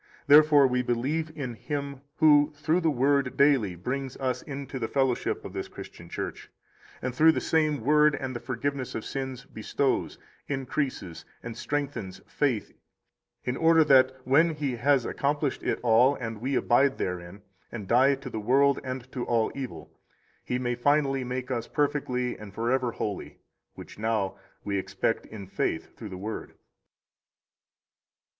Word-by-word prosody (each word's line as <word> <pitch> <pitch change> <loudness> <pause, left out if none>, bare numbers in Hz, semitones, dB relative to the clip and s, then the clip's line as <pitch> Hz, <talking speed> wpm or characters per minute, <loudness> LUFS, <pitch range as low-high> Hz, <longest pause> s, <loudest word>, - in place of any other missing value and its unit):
Therefore 150 -1 +7
we 125 -1 +2
believe 135 +7 -1
in 130 -5 -4
Him 140 +2 -5
who 150 -2 +5
through 155 +4 +1
the 165 - +2
Word 140 -1 +1
daily 135 -10 +3
brings 130 +8 -4
us 130 -2 -2
into 140 -2 -6
the 115 - -2
fellowship 135 -2 0
of - - -7
this - - -4
Christian - - -11
Church, - - -6 0.5
and 130 0 -2
through 160 +5 +5
the - - 0
same 155 -4 +1
Word 150 +3 +4
and 130 -2 -5
the - - -3
forgiveness 130 +1 -3
of 110 - -4
sins 130 -2 -5
bestows, 135 +3 -1 0.3
increases, 130 - -3 0.2
and 115 -1 -6
strengthens 135 -10 -3
faith, 130 -7 -1 0.7
in 125 - -2
order 165 +2 +5
that 130 -3 +5
when 155 +6 +3
He 140 -5 -2
has 135 0 +3
accomplished 145 0 -1
it - - -1
all, 125 +4 +5
and 115 -4 -6
we 135 +2 -1
abide 135 +3 +3
therein, 90 +2 -5 0.3
and 105 -5 -6
die 130 +5 +4
to 135 0 -8
the 110 - -3
world 135 +5 +3
and 130 -1 -4
to 125 - -3
all 115 -2 +1
evil, 135 -3 -7 0.5
He 125 - -2
may 120 -1 -1
finally 135 +1 +2
make 125 +1 -4
us 120 -2 -2
perfectly 135 -4 -1
and 100 -2 -11
forever 120 +2 0
holy; 105 -2 -5 0.4
which - - -11
now 110 -3 0 0.3
we 100 -1 -1
expect 95 +3 -2
in 105 -3 -9
faith 95 - -3
through 110 - -8
the 95 - -7
Word. 105 +4 -6
130 Hz, 155 wpm, -27 LUFS, 115-145 Hz, 0.7 s, Therefore